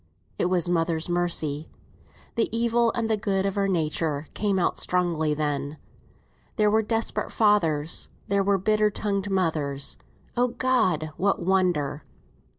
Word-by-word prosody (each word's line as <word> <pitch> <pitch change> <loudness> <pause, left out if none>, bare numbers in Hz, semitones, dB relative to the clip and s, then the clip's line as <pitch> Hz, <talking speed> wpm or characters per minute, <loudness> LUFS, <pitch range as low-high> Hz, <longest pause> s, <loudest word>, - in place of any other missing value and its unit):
It - - +2
was 180 -1 +1
mother's 165 -1 0
mercy. 160 -4 0 0.6
The 230 - 0
evil 235 0 +2
and 230 -1 -1
the 220 - +2
good 195 -2 0
of 195 0 -1
our 200 -1 +1
nature 160 -4 0
came 200 -2 0
out 180 - 0
strongly 170 -4 0
then. 145 -1 -2 0.8
There 210 -2 +3
were 220 +1 +4
desperate 225 +1 -1
fathers; 165 -8 +2 0.2
there 200 0 +2
were 200 0 +2
bitter 215 +2 +2
tongued 205 -1 -2
mothers 155 -7 0 0.4
(O 245 +1 +3
God! 230 -11 +1
what 200 +2 +1
wonder!) 170 -6 +1
185 Hz, 140 wpm, -25 LUFS, 155-210 Hz, 0.8 s, were